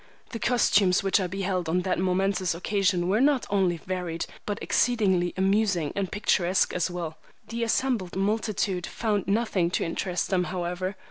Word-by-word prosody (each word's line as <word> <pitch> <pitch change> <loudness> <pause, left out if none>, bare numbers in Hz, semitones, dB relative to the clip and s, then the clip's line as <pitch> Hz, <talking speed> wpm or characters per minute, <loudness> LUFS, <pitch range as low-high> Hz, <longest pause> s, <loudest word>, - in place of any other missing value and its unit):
The 230 - -5
costumes 205 -6 +3
which 195 +2 +3
I 185 - -1
beheld 185 -2 -2
on 180 +2 +1
that 185 -1 -1
momentous 185 -1 +1
occasion 185 -1 0
were 205 +5 +2
not 280 -2 +3
only 190 -4 +2
varied 175 -2 -4 0.2
but 205 -1 -2
exceedingly 190 -7 +2
amusing 190 -5 +1
and 195 -2 -2
picturesque 190 -3 +1
as 180 0 0
well. 170 -3 -5 0.3
The 230 +1 -2
assembled 230 -5 0
multitude 195 -2 -1
found 210 -4 -1
nothing 200 -4 +1
to - - -1
interest 180 +3 -2
them, 180 -2 +2
however. 180 +1 -3
190 Hz, 155 wpm, -26 LUFS, 180-205 Hz, 0.3 s, costumes